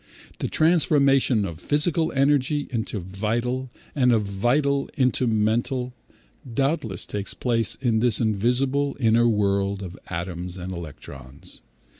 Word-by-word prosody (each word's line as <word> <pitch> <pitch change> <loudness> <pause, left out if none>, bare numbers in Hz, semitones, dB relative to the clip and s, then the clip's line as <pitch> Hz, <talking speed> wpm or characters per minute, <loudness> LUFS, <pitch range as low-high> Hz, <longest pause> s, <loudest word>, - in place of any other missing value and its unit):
The - - -1
transformation 140 - +3
of 80 -4 -6
physical 160 - +1
energy 140 +1 +2
into 110 -3 -3
vital, 115 +8 -2 0.2
and 125 -3 +3
of 110 -3 +3
vital 135 +8 0
into 130 -1 +2
mental, 120 +4 0 0.6
doubtless 135 - -1
takes 100 -1 -5
place 115 -3 0
in 120 -4 0
this 115 -2 +3
invisible 125 +6 +1
inner 115 -1 +4
world 100 -2 0
of 90 -1 -7
atoms 90 +1 -5
and 90 +1 -5
electrons. 75 -1 -9
115 Hz, 120 wpm, -24 LUFS, 100-135 Hz, 0.6 s, inner